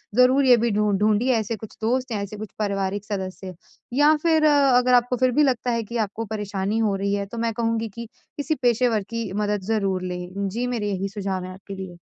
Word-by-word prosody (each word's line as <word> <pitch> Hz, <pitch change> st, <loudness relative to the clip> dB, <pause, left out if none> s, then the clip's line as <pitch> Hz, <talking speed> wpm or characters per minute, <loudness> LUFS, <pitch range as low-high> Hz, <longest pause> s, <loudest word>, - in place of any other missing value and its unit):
ज़रूर 255 Hz, +3 st, +5 dB
ये 250 Hz, -2 st, +7 dB
भी 235 Hz, 0 st, +1 dB
ढूँढ 210 Hz, -1 st, +1 dB
ढूँढिए 215 Hz, +4 st, +3 dB
ऐसे 220 Hz, +1 st, -3 dB
कुछ 220 Hz, 0 st, -11 dB
दोस्त 250 Hz, +3 st, 0 dB
या 210 Hz, -3 st, -1 dB
ऐसे 200 Hz, +1 st, -6 dB
कुछ 215 Hz, 0 st, -7 dB
पारिवारिक 200 Hz, -1 st, -1 dB
सदस्य। 190 Hz, -2 st, -5 dB, 0.4 s
या 295 Hz, +4 st, +5 dB
फिर 320 Hz, -2 st, +3 dB
अ, 300 Hz, -1 st, +5 dB, 0.2 s
अगर 250 Hz, 0 st, +3 dB
आपको 245 Hz, 0 st, +3 dB
फिर 255 Hz, +1 st, +3 dB
भी 300 Hz, +5 st, +3 dB
लगता 250 Hz, -3 st, +1 dB
है 230 Hz, -1 st, 0 dB
कि 235 Hz, +3 st, -5 dB
आपको 225 Hz, +3 st, -6 dB
परेशानी 205 Hz, -1 st, -2 dB
हो 210 Hz, -3 st, +1 dB
रही 200 Hz, +1 st, -1 dB
है, 200 Hz, 0 st, -1 dB
तो 220 Hz, +4 st, -9 dB
मैं 230 Hz, 0 st, -1 dB
कहूँगी 230 Hz, 0 st, -1 dB
कि 235 Hz, 0 st, -6 dB, 0.3 s
किसी 300 Hz, +2 st, -1 dB
पेशेवर 240 Hz, -3 st, +2 dB
की 230 Hz, -4 st, -4 dB
मदद 205 Hz, -1 st, -1 dB
ज़रूर 195 Hz, -4 st, 0 dB
लें। 180 Hz, +2 st, -4 dB
जी, 235 Hz, +5 st, -2 dB
मेरे 230 Hz, -4 st, -2 dB
यही 195 Hz, 0 st, -2 dB
सुझाव 195 Hz, -2 st, -3 dB
हैं 185 Hz, -, -7 dB
आपके 195 Hz, +1 st, -9 dB
लिए। 190 Hz, -2 st, -8 dB
215 Hz, 225 wpm, -23 LUFS, 200-245 Hz, 0.4 s, ये